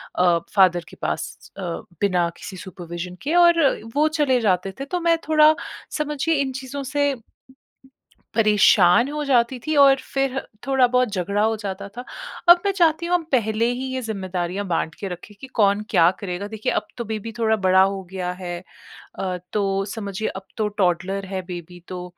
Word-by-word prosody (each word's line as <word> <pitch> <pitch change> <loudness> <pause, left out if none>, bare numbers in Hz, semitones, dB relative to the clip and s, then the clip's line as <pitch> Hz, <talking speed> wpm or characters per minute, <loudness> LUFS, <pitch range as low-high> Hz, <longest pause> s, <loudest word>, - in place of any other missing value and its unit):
अ, 175 -2 +3 0.2
father 175 -3 +4
के - - -13
पास - - -4
अ, - - -6 0.4
बिना 180 -4 +2
किसी 190 - -8
सुपरविज़न 175 0 -7
के 310 +5 0
और 345 -1 +6 0.3
वो 305 +1 +4
चले 295 -5 +2
जाते 190 -2 +1
थे 275 - -3
तो 355 +5 -2
मैं 335 -1 +3
थोड़ा 310 0 +6 0.4
समझिए 300 +2 0
इन 265 -1 -1
चीज़ों 265 +2 -6
से 285 +1 0 1.2
परेशान 215 +1 +5
हो 300 0 -3
जाती 250 -1 +2
थी 310 -1 0
और 275 -1 +7 0.2
फिर 270 -1 0 0.3
थोड़ा 265 -2 +4
बहुत 250 -2 +3
झगड़ा 200 +2 -1
हो 220 +1 +2
जाता 200 -1 -5
था। 245 - -5 0.5
अब 345 0 +9
मैं 400 - +3
चाहती 340 -2 +2
हूँ 350 - -1
हम 340 - 0
पहले 225 -2 +1
ही 255 +2 -4
ये 260 - -2
जिम्मेदारियाँ 190 -3 -3
बाँट 165 -2 -1
के 200 - -6
रखें 180 +3 -9
कि 265 - -8
कौन 205 -4 +2
क्या 165 0 +5
करेगा? 195 +1 -4
देखिए 220 0 -3
अब - - -1
तो 235 - -3
बेबी 220 +1 -4
थोड़ा 220 -1 +3
बड़ा 190 -2 +4
हो 195 0 -1
गया 180 -1 -3
है। 175 -1 -4 0.6
अ, 185 -1 -2 0.2
तो 195 -1 0
समझिए 205 0 -4
अब 190 0 -8
तो 215 -1 +1
टौडलर 195 -1 0
है 190 -1 -4
बेबी 175 0 -8
तो 180 -1 -6
210 Hz, 180 wpm, -22 LUFS, 185-270 Hz, 1.2 s, अब